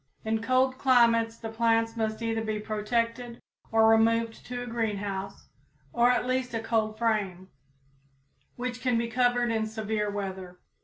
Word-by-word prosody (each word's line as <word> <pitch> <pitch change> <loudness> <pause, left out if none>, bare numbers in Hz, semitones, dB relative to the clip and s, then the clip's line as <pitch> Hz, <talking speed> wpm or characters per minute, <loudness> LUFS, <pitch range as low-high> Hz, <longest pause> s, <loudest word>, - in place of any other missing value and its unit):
In 220 0 0
cold 255 +2 +1
climates 230 -3 +3
the 225 - -6
plants 225 0 +1
must 220 0 -2
either 225 -1 -1
be 215 -1 -2
protected 230 +3 -2 0.3
or 225 0 +5
removed 225 0 +2
to 245 0 -4
a - - -6
greenhouse, 205 -4 -4 0.4
or 240 +1 +4
at 250 - +2
least 255 -1 -1
a - - 0
cold 220 -1 -1
frame, 200 -5 -1 1.1
which 250 0 -4
can 250 -2 +1
be 230 0 0
covered 245 -1 +2
in 220 -1 0
severe 215 -1 -2
weather. 190 -3 -5
225 Hz, 150 wpm, -28 LUFS, 215-240 Hz, 1.1 s, or